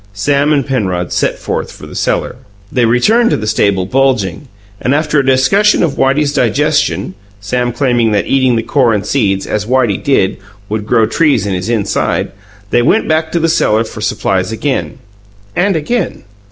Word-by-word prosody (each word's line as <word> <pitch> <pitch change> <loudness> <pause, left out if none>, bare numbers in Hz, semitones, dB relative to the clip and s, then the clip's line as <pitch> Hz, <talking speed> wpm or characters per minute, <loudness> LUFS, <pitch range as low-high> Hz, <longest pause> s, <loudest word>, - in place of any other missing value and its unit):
Sam 140 +7 +1
and 140 -4 +1
Penrod 95 -10 -2
set - - 0
forth - - -4
for - - -12
the - - -11
cellar. - - -2 0.3
They 125 -2 +2
returned 220 - +3
to - - +1
the 110 - -5
stable 100 -3 +1
bulging, 130 - 0 0.3
and, 130 - +1
after 150 -1 +1
a - - +1
discussion 155 +13 +3
of 165 - +1
Whitey's 140 +2 +1
digestion 145 0 0 0.3
(Sam 120 +5 -1
claiming 120 -3 +1
that 105 -1 +1
eating 130 -2 +2
the 115 - -1
core 125 -5 +2
and 105 0 -3
seeds, 100 -7 0
as 105 -1 -3
Whitey 120 -5 +1
did, 115 -9 +1 0.3
would 105 0 -3
grow 110 - +3
trees 135 - +1
in 100 - -2
his 90 +4 -3
inside) 110 -4 -1 0.4
they 120 - +3
went 165 - +2
back 160 0 0
to 170 - +1
the 165 - +1
cellar 115 -9 +2
for 110 -1 -9
supplies 95 -1 -1
again 130 +3 -2 0.6
and 195 +1 +1
again. 185 +6 -2
125 Hz, 180 wpm, -13 LUFS, 105-145 Hz, 0.6 s, returned